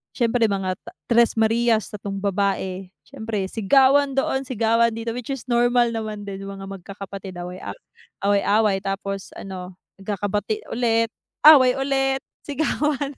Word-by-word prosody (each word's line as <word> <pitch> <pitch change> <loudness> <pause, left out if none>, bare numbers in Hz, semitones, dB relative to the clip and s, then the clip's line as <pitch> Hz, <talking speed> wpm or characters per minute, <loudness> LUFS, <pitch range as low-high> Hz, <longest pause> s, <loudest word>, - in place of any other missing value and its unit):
siyempre 235 -1 +2
mga 190 -3 -2
ta - - -13 0.2
tres 235 0 +4
marias, 225 0 +2
3 200 -1 -6
babae 195 -1 -1 0.2
siyempre 220 -3 -4
sigawan 270 +5 +4
doon, 270 0 0
sigawan 230 -1 +2
dito, 230 0 -3
which 245 0 -6
is 270 -4 -4
normal 240 0 +3
naman 215 -2 -4
din 200 -1 -6
mga 195 0 -7
magkakapatid 195 0 -8
away-aw 180 +1 -7 0.5
away-away 200 0 +3
tapos 195 0 -5
ano 185 -1 -8 0.2
nagkakabati 205 +1 -2
ulit 230 -1 +1 0.3
away 270 -5 +8
ulit 270 0 0 0.2
sigawan. 290 -1 -1
220 Hz, 130 wpm, -23 LUFS, 195-245 Hz, 0.5 s, away